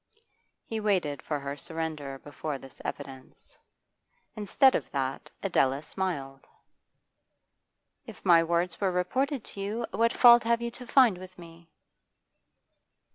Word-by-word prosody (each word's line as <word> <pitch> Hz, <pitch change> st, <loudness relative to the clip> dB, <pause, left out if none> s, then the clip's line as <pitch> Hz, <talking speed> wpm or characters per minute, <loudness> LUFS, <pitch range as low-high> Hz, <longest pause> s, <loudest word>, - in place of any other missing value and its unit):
He 225 Hz, -, -4 dB
waited 185 Hz, -10 st, 0 dB
for 150 Hz, -2 st, -3 dB
her 140 Hz, 0 st, -5 dB
surrender 160 Hz, -3 st, -5 dB
before 145 Hz, +1 st, -6 dB
this 135 Hz, -1 st, -14 dB
evidence. 130 Hz, -1 st, -9 dB, 0.8 s
Instead 235 Hz, +6 st, +3 dB
of -, -, -2 dB
that 135 Hz, -1 st, -3 dB
Adela 140 Hz, -7 st, +1 dB
smiled. 145 Hz, -6 st, -4 dB, 1.6 s
'If -, -, -12 dB
my 165 Hz, -1 st, +6 dB
words 170 Hz, +1 st, -1 dB
were 195 Hz, -2 st, +2 dB
reported 255 Hz, +9 st, -1 dB
to 200 Hz, -, -8 dB
you, 215 Hz, +4 st, -3 dB
what 230 Hz, +3 st, +2 dB
fault 240 Hz, -1 st, +7 dB
have 230 Hz, 0 st, +2 dB
you 235 Hz, 0 st, -4 dB
to 250 Hz, +1 st, -12 dB
find 235 Hz, -10 st, +4 dB
with 185 Hz, 0 st, -12 dB
me? 170 Hz, -1 st, -14 dB
175 Hz, 130 wpm, -28 LUFS, 145-220 Hz, 1.6 s, fault